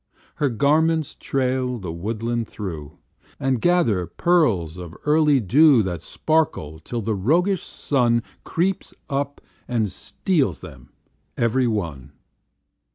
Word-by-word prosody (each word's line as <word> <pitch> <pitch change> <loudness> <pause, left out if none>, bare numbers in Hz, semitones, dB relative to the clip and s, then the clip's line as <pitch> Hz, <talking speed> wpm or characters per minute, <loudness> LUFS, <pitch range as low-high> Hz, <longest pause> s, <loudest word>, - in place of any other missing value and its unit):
Her 145 -2 +1
garments 155 +5 +2
trail 130 -1 -1
the 95 -6 -6
woodland 115 +6 -3
through, 80 -7 -7 0.4
And 130 -3 0
gather 120 - +2
pearls 115 - +1
of 90 -1 -9
early 150 -2 +4
dew 130 - +5
That 90 -4 -4
sparkle 140 - -1
till 115 +8 -5
the 110 +2 0
roguish 165 - +2
Sun 120 -4 +1 0.2
Creeps 185 +3 -1 0.2
up 140 +1 -2 0.3
and 110 -5 0
steals 140 - -1
them - - -12 0.5
every 120 +2 +2
one. 80 - -3
120 Hz, 115 wpm, -23 LUFS, 95-150 Hz, 0.5 s, dew